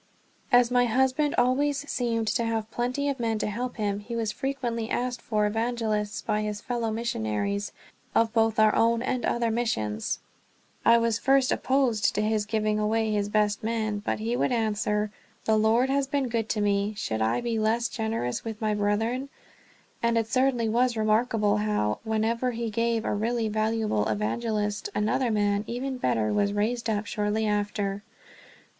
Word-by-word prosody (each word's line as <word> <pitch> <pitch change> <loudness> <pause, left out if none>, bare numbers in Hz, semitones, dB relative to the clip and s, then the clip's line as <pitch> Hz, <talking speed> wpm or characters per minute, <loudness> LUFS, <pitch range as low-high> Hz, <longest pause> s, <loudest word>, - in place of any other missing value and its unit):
As 245 -1 +5
my 245 0 +4
husband 265 +5 +2
always 280 +3 +1
seemed 230 -4 -1
to 225 +2 +1
have 225 -1 -2
plenty 250 +5 -1
of 275 -2 -1
men 225 -2 0
to - - -2
help 240 +4 -3
him, 205 -2 -1
he 230 +3 -6
was 225 -2 -1
frequently 240 -4 -3
asked 245 -1 -2
for 210 -2 0
evangelists 220 -1 -1
by 210 - 0
his 210 -1 -3
fellow 235 -1 -2
missionaries 200 - -2 0.4
of 225 -1 +3
both 225 -1 +2
our 215 -1 +5
own 230 +1 +2
and 255 -1 -1
other 235 -1 +1
missions. 110 - -1 0.7
I 230 0 +6
was 230 -1 +1
at - - -23
first 270 -1 +4
opposed 255 -5 +1
to 210 - +1
his 215 -1 0
giving 215 -1 0
away 220 +1 +1
his 205 -1 0
best 210 0 +1
men, 215 -2 -1
but - - -1
he 225 +3 -2
would 250 - +1
answer, 215 -2 0 0.3
"The 220 - +3
Lord 225 +5 +3
has 275 0 +1
been 275 -2 -1
good 225 -2 -1
to 215 - 0
me; 205 +1 +1
should 110 - -2
I 110 - +2
be 235 -2 -1
less 225 +2 +1
generous 220 - -2
with 220 -2 -5
my 215 -1 0
brethren?" 220 +6 0 0.7
And 235 0 +2
it 225 - +2
certainly 250 0 +1
was 240 +1 +2
remarkable 215 -1 +2
how, 210 - 0
whenever 230 +3 0
he 230 -1 -3
gave 230 +1 0
a - - 0
really 225 +2 0
valuable 215 - 0
evangelist, 210 - -1
another 235 +4 +1
man, 205 -1 +1
even 255 +2 -3
better, 110 - +1
was 200 - +1
raised 225 +3 -1
up 210 -1 -1
shortly 210 0 -1
after. 205 -1 -1
225 Hz, 175 wpm, -27 LUFS, 210-240 Hz, 0.7 s, I